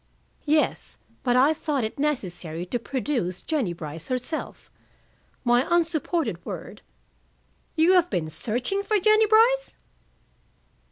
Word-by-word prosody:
"Yes. 305 +1 +1 0.2
But 245 -1 +1
I 270 +5 +5
thought 295 -4 -2
it 220 +5 -4
necessary 180 - -2
to 240 +7 -2
produce 240 -8 -2
Jennie 280 - -1
Brice 160 -1 -7
herself. 255 +5 -4 0.7
My 240 0 +4
unsupported 325 - 0
word - - -7 0.5
" - - -40
"You 330 +3 +5
have 355 -1 +4
been 160 -3 -1
searching 245 - -2
for 420 +1 +1
Jennie 430 +2 +5
Brice?" 475 +4 +4
275 Hz, 120 wpm, -25 LUFS, 215-340 Hz, 0.7 s, I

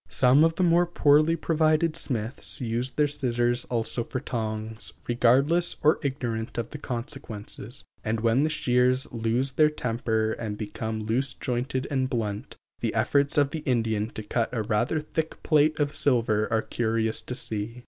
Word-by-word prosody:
Some 130 +4 +5
of 165 0 +3
the 185 - +1
more 175 0 +4
poorly 155 -1 +4
provided 160 0 +2
smiths 120 -5 -3
use 120 0 -1
their 150 +2 +1
scissors 120 -4 0
also 120 0 -1
for 130 - -4
tongs, 110 -3 -4
regardless 135 +9 +3
or 155 - +4
ignorant 120 -4 -3
of 120 -1 -3
consequences, 120 -1 -6 0.2
and 110 +1 -1
when 115 +3 +3
the 155 - +2
shears 125 -2 +2
lose 120 +3 0
their 150 +3 +4
temper 115 -5 -1
and 110 -2 -4
become 110 +1 -4
loose 125 +5 -1
jointed 130 +1 -2
and 130 -2 0
blunt, 110 0 -3 0.2
the 115 -2 -2
efforts 140 +6 +2
of 145 -1 +3
the 160 - -3
Indian 115 -6 0
to 110 - -5
cut 115 +2 -1
a 115 -3 -1
rather 120 +8 0
thick 160 +1 -4
plate 155 0 +3
of 145 0 0
silver 115 -7 +2
are 110 -1 +2
curious 110 -1 -1
to 125 - -5
see. 115 -1 -4
125 Hz, 160 wpm, -26 LUFS, 110-145 Hz, 0.2 s, Some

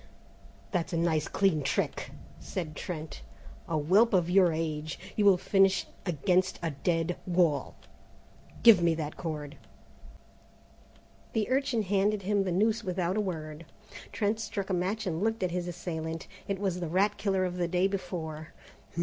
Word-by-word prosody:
"That's 180 -1 -1
a - - +1
nice 160 -2 +1
clean 190 -6 +2
trick," 140 - -1 0.3
said 155 -5 -5
Trent; 160 -2 -6 0.5
"a 160 - 0
whelp 195 +10 +4
of 175 -1 +2
your 185 -2 +5
age! 155 -1 -3 0.2
You'll 200 -3 +5
finish 195 +1 +3 0.2
against 180 +3 +1
a 165 - 0
dead 165 +4 -1
wall! 170 -5 +1 0.9
Give 225 -6 +8
me 170 -1 +3
that 155 -2 -4
cord!" 150 -3 -5 1.8
The 220 -2 0
urchin 260 -4 +1
handed 200 +1 +1
him 200 0 +1
the 185 - -1
noose 215 +5 +2
without 180 0 -1
a 215 - +2
word. 160 -4 -5 0.4
Trent 215 +1 0
struck 200 -3 -4
a - - +1
match 195 +5 -1
and 170 -2 -2
looked 225 -1 0
at 180 - 0
his 180 0 -2
assailant. 165 -2 -5 0.2
It 200 - -1
was 190 -2 -1
the 175 - -3
rat 200 +5 +1
killer 190 -2 +1
of 180 0 -3
the 175 -1 0
day 180 +2 +1
before. 160 -5 -5
180 Hz, 155 wpm, -29 LUFS, 165-195 Hz, 1.8 s, Give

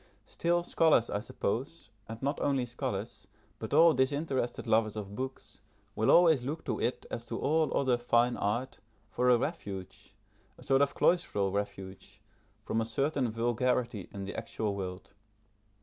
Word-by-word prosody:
Still, 175 +1 0
scholars, 160 -9 +3
I 100 - 0
suppose, 120 +6 -4 0.2
and 115 0 -6
not 140 +2 -1
only 135 -3 +1
scholars, 120 0 -5 0.3
but - - -6
all 165 0 +6
disinterested 130 -2 -1
lovers 110 -2 +2
of 100 -2 -6
books, 130 -2 -6 0.3
will 110 - +1
always 165 -6 +6
look 145 +6 -5
to - - -2
it, 125 - -1
as 115 - -4
to 115 - -4
all 155 +2 +1
other 130 -3 +2
fine 120 0 +2
art, 120 +6 -2 0.3
for 125 0 +1
a 125 - +6
refuge, 100 - -6 0.4
a - - -14
sort 135 0 +3
of 140 - +1
cloistral 105 - +2
refuge, 100 0 -5 0.5
from 115 - 0
a - - -1
certain 135 +2 0
vulgarity 120 -2 -1
in 100 - -6
the 100 - -6
actual 105 -2 -3
world. 95 0 -6
120 Hz, 155 wpm, -30 LUFS, 105-140 Hz, 0.5 s, all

